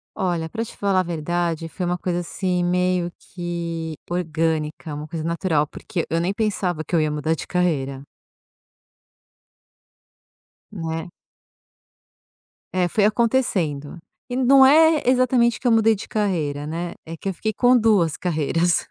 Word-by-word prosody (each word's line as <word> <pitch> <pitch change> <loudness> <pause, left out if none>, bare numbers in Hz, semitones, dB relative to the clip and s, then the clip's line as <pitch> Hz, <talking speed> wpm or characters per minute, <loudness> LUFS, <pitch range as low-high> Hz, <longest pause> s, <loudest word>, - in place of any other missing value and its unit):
Olha, 170 -3 -1
pra 225 +6 -3
te - - -12
falar 195 -2 +1
a - - +2
verdade 170 0 -2
foi 180 - -4
uma 175 0 0
coisa, 175 0 -2
assim, 180 +1 -1
meio 180 0 +1
que 170 -2 -5
orgânica, 160 -2 -2
uma 150 +1 -6
coisa 160 0 -5
natural, 165 -2 +1
porque 175 +3 -5
eu 165 - +1
nem 175 +3 0
pensava 190 -6 -1
que 155 - -12
eu 170 - +4
ia 155 -1 +1
mudar 150 +1 -1
de 160 - -6
carreira. 140 -7 -1 2.7
Né. 165 -3 -4 1.6
É, 180 -1 +2
foi 205 +4 +1
acontecendo 205 - 0 0.3
e 245 - -3
não 265 +1 +6
é 315 +3 +6
exatamente 250 -2 +3
que 250 - -1
eu - - +4
mudei 225 0 +5
de 200 - -7
carreira, 160 -9 -1
né, 170 +3 -4
é 165 +1 -7
que 195 - -7
eu 195 - 0
fiquei 220 +4 -2
com 250 +2 +4
2 205 -9 +3
carreiras. 170 0 0
175 Hz, 150 wpm, -22 LUFS, 160-205 Hz, 2.7 s, não